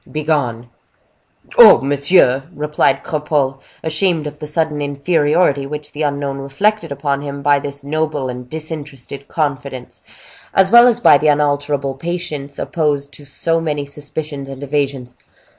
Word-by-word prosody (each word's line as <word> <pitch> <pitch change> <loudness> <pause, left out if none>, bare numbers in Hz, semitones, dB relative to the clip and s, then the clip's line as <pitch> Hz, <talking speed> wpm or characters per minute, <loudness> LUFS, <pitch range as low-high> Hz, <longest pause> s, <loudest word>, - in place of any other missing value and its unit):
Begone!" 145 -7 -1 0.9
"Oh! - - +10
monsieur," 140 -1 +3
replied 150 0 0
Cropole, 150 -3 -1 0.2
ashamed 160 0 +1
of 150 0 -7
the 150 - -6
sudden 150 -1 -1
inferiority 145 0 +1
which 150 +1 -7
the 150 - -7
unknown 140 -2 -2
reflected 165 +6 -1
upon 140 0 -2
him 140 -1 -6
by 145 0 +4
this 140 0 -6
noble 150 -1 -2
and 125 0 -7
disinterested 145 -3 -7
confidence, 140 -4 -4 0.5
as 190 0 +4
well 235 +1 +8
as 240 -1 +2
by 145 -11 +6
the 155 - +1
unalterable 145 -1 +1
patience 150 -2 -5
opposed 145 -3 -1
to 145 - -10
so 165 +4 0
many 150 -3 -2
suspicions 145 0 -6
and 135 +1 -8
evasions. 135 -3 -2
145 Hz, 140 wpm, -17 LUFS, 140-155 Hz, 0.9 s, Oh